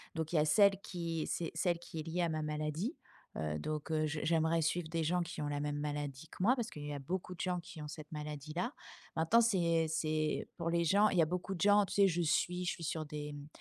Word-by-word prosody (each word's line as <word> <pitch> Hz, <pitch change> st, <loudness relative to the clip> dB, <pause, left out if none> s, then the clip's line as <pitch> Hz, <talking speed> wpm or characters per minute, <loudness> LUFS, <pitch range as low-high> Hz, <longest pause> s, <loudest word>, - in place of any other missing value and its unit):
donc 160 Hz, +1 st, -3 dB
il -, -, +1 dB
y -, -, +5 dB
a 150 Hz, -, +4 dB
celle 200 Hz, +5 st, +5 dB
qui 165 Hz, -3 st, -3 dB
c'est 165 Hz, -2 st, -2 dB
celle 170 Hz, 0 st, +1 dB
qui 165 Hz, -2 st, -7 dB
est -, -, -6 dB
lié 165 Hz, +3 st, -2 dB
à 170 Hz, -, +2 dB
ma 155 Hz, 0 st, -1 dB
maladie, 155 Hz, -, -2 dB, 0.4 s
heu, 75 Hz, -1 st, -1 dB
donc 155 Hz, -, -3 dB
heu, 155 Hz, -1 st, +2 dB
j 150 Hz, 0 st, -2 dB
j'aimerais 165 Hz, 0 st, +2 dB
suivre 160 Hz, +1 st, 0 dB
des 165 Hz, 0 st, 0 dB
gens 175 Hz, +3 st, +1 dB
qui 170 Hz, -2 st, -4 dB
ont 145 Hz, -, -1 dB
la 145 Hz, 0 st, -1 dB
même 145 Hz, 0 st, -2 dB
maladie 145 Hz, 0 st, -3 dB
que -, -, -13 dB
moi 240 Hz, +8 st, +5 dB
parce 235 Hz, -3 st, -2 dB
qu'il 145 Hz, -7 st, -8 dB
y 145 Hz, -, -4 dB
a 140 Hz, -, -4 dB
beaucoup 180 Hz, +5 st, -4 dB
de -, -, -22 dB
gens 180 Hz, -1 st, 0 dB
qui 165 Hz, -2 st, -10 dB
ont 150 Hz, -, -5 dB
cette 155 Hz, +1 st, -9 dB
maladie 150 Hz, -1 st, -5 dB
là. 235 Hz, -, -1 dB, 0.4 s
Maintenant 165 Hz, +9 st, +5 dB
c'est 170 Hz, -7 st, +3 dB
c'est 155 Hz, -1 st, 0 dB
pour 170 Hz, -1 st, -1 dB
les 170 Hz, 0 st, +2 dB
gens, 200 Hz, +5 st, +5 dB
il 180 Hz, -, -1 dB
y -, -, +7 dB
a -, -, +5 dB
beaucoup 180 Hz, +3 st, -3 dB
de 165 Hz, -, -7 dB
gens, 205 Hz, 0 st, +6 dB
tu -, -, -6 dB
sais? 200 Hz, -1 st, +6 dB
Je 175 Hz, -1 st, +1 dB
suis 180 Hz, +2 st, +1 dB
je 180 Hz, -, +1 dB
suis 170 Hz, -, -6 dB
sur 155 Hz, 0 st, -2 dB
des, 150 Hz, 0 st, -5 dB
mmh, 145 Hz, 0 st, -8 dB
160 Hz, 275 wpm, -34 LUFS, 150-180 Hz, 0.4 s, y